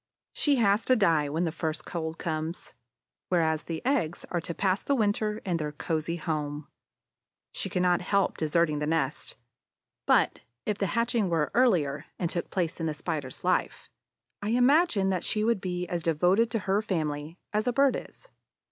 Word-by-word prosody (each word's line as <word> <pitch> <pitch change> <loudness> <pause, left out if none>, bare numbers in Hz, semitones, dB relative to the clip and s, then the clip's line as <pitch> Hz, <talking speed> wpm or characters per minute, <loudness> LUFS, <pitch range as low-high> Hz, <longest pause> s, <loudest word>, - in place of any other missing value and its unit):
She 290 -2 +2
has 210 -3 +3
to 255 - +4
die 165 - +3
when 160 +4 -1
the 165 - 0
first 155 -1 -3
cold 160 -1 -4
comes, 160 +1 -4 0.6
whereas 160 -3 +1
the 165 +3 -5
eggs 235 - 0
are 175 - 0
to 170 +1 -5
pass 190 0 +1
the 280 - +1
winter 210 -1 0
in 180 -3 0
their 150 -2 -3
cozy 160 +2 -2
home. 150 -3 -3 0.8
She - - -3
cannot 180 -1 +2
help 195 +1 +1
deserting 155 -1 +1
the 150 - -2
nest. 155 -3 -1 0.7
But, - - +3 0.3
if 210 -1 -1
the 195 - +1
hatching 230 -4 +1
were 160 -3 0
earlier 175 - +2
and 170 -3 -1
took 170 - -3
place 175 -2 -2
in 165 - -1
the 155 - -2
Spider's 150 -4 -4
life, - - -1 0.5
I 205 - -3
imagine 245 - +4
that 185 -2 -1
she 215 - 0
would 225 -3 +1
be 180 -1 -3
as 175 -1 -2
devoted 180 +8 +3
to 225 0 -1
her 195 +2 +2
family 155 -5 -3 0.2
as 215 +3 0
a - - +3
Bird 275 +2 +3
is. - - -9
175 Hz, 175 wpm, -28 LUFS, 160-210 Hz, 0.8 s, to